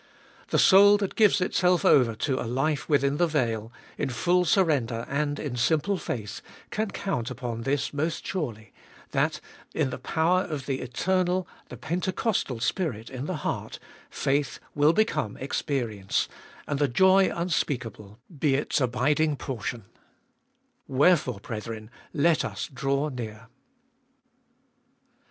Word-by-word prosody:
The - - 0
soul 205 +1 +7
that 200 -2 -2
gives 210 -3 +4
itself 180 -1 +2
over 120 -5 +5
to 130 +4 -1
a 115 - -4
life 140 +5 -1
within 140 -1 +2
the 175 - +3
veil, 115 -7 -1 0.3
in 140 - 0
full 180 +9 +2
surrender 140 - +2
and 145 +1 -1
in 140 -5 -4
simple 160 +10 +1
faith, 110 - -5 0.3
can 215 0 -1
count 160 - -3
upon 120 -2 -5
this 135 +4 -1
most 155 +3 -2
surely, 115 - -4 0.4
that, - - +1 0.4
in 145 -5 +1
the - - -5
power 170 +3 +2
of 150 -7 -5
the 135 -1 -2
eternal, 180 +7 0 0.2
the - - -8
Pentecostal 180 - -1
Spirit 125 - -2
in 130 +2 -5
the 185 - -2
heart, - - -3 0.3
faith 140 +1 -1
will 145 +1 +4
become 170 - 0
experience, 120 -8 -1 0.4
and 145 -1 -1
the 145 - +3
joy 190 +9 +4
unspeakable 125 - -3 0.2
be 140 -3 +3
its 145 +1 0
abiding 145 +5 +2
portion 120 -5 -5 0.6
— - - -45 0.2
Wherefore, 135 - +3
brethren, 110 0 -6 0.2
let 160 +2 +2
us - - -4
draw 140 +3 0
near. 115 -3 -7
140 Hz, 135 wpm, -27 LUFS, 120-170 Hz, 0.6 s, soul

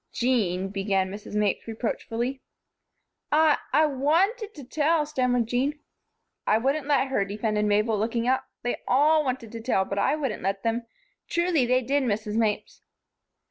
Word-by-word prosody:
"Jean," 195 -7 0
began 195 -1 0
Mrs. 205 +1 -8
Mapes, 210 0 0
reproachfully. 235 +3 -3 0.9
"I 310 0 +4
I 310 - +5
wanted 350 - +1
to 290 - -9
tell," 300 +4 +1
stammered 250 -5 +1
Jean. 260 +6 -1 0.7
"I 215 - +4
wouldn't 275 +5 0
let 280 -2 +2
her," 235 -7 +1
defended 210 +1 -1
Mabel, 210 +1 +2
looking 230 +2 -1
up. 260 +1 +1 0.2
"They 245 - -1
all 305 +4 +4
wanted 250 -5 -3
to 230 - -7
tell, 220 -5 +1
but 200 +1 -3
I 200 - +2
wouldn't 270 -8 -3
let 195 +1 -2
them. 230 +1 -1 0.4
Truly, 340 -7 +2
they 255 +1 +2
did, 280 +4 +1
Mrs. 215 -3 -1
Mapes." 220 -2 -1
245 Hz, 155 wpm, -26 LUFS, 210-285 Hz, 0.9 s, I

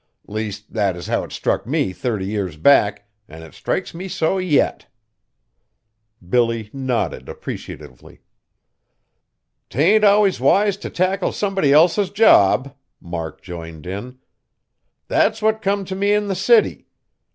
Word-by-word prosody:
Least, 105 0 -6
that 100 -5 0
is 90 - -8
how - - -1
it - - -10
struck - - -2
me 95 - -1
thirty 110 -3 -3
year 100 -2 -3
back, 105 - +3 0.2
an' 80 +1 -11
it 80 - -13
strikes - - -3
me 180 +3 -7
so 185 0 -1
yet." 180 -6 0 1.4
Billy 115 0 0
nodded 125 - -3
appreciatively. 65 - -9 1.5
"'T - - -11
ain't 205 +8 +4
always 205 -1 +4
wise 200 0 +3
t' 200 - -8
tackle 185 +1 0
somebody 195 -8 0
else's 175 +6 +4
job," 140 - +4 0.3
Mark 85 -2 -7
joined 80 -3 -9
in, 100 +8 -7 0.9
"that's 215 +1 +1
what 220 0 +1
come 200 -1 -1
t' 190 - -5
me 200 +2 +1
in 210 -1 0
the 195 - -1
city. 460 - +2
140 Hz, 135 wpm, -20 LUFS, -, 1.5 s, ain't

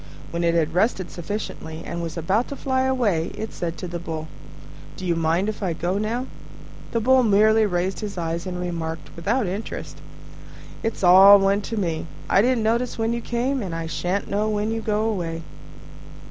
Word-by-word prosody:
When 170 0 -2
it 170 0 +2
had 160 -1 +1
rested 185 -1 +1
sufficiently 170 -3 -5
and 170 0 -4
was 165 0 -5
about 190 +9 +1
to 280 - -6
fly 260 -1 0
away, 215 -11 +1
it 220 - -5
said 170 -1 -4
to 180 - -5
the 175 0 -5
Bull, 160 -2 -5 0.7
"Do 185 - -6
you 170 -1 +1
mind 165 +4 +1
if 215 0 -4
I 185 -4 0
go 180 +4 -1
now?" 230 +4 -1 0.7
The 230 - +1
Bull 260 +3 +5
merely 215 0 +4
raised 180 0 -1
his 205 -3 -5
eyes 170 +1 -2
and 180 -1 -4
remarked, 165 -3 -4
without 210 +9 0
interest, 195 +4 -5 0.8
"It's 225 -3 -3
all 190 +3 +9
one 195 +1 +2
to 225 +3 -5
me; 165 -5 -2 0.2
I 195 - +4
didn't 245 0 +2
notice 235 +3 0
when 225 +1 0
you 235 - -2
came, 250 +3 -1
and 180 -5 -4
I 165 0 -3
shan't 180 +4 -2
know 210 +2 0
when 210 +1 0
you 225 0 -2
go 210 -1 0
away." 165 -6 -3
195 Hz, 190 wpm, -23 LUFS, 170-220 Hz, 0.8 s, all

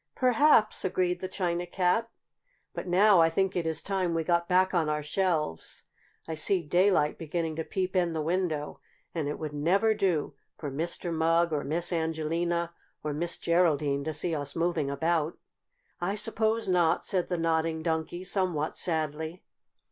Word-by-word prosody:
"Perhaps," 255 -3 +4
agreed 180 -1 0
the 185 - -4
China 175 -2 -2
Cat. 190 +6 +1 0.6
"But - - -6
now 190 +1 +5
I 165 - +5
think 190 +3 0
it 170 -2 -1
is 160 -1 -2
time 185 -4 -1
we 165 - 0
got 170 +1 0
back 185 +1 +3
on 165 -4 +1
our 150 0 -1
shelves. 155 - -2 0.4
I 165 - -3
see 175 +3 +2
daylight 175 -1 +2
beginning 165 0 -3
to 160 - -1
peep 185 +1 -3
in 175 -2 +2
the 160 - -2
window, 160 -3 -2 0.3
and 160 -4 -2
it 145 - -3
would 155 -2 -5
never 190 +9 +2
do 185 -9 0 0.2
for 145 -3 -5
Mr. 170 +4 -2
Mugg 165 +1 +2
or 145 - -1
Miss 170 +5 0
Angelina 165 +1 -1 0.3
or 150 -1 -2
Miss 170 +3 -2
Geraldine 150 -5 +1
to 160 - -1
see 165 +3 0
us 145 -2 -2
moving 165 -4 0
about." 160 +2 0 0.6
"I 185 +3 -1
suppose 220 +1 0
not," 175 -3 +2
said 185 -2 0
the 180 - -2
Nodding 160 -1 0
Donkey, 165 +2 -2
somewhat 180 -5 -1
sadly. 160 +1 0
170 Hz, 165 wpm, -28 LUFS, 160-185 Hz, 0.6 s, now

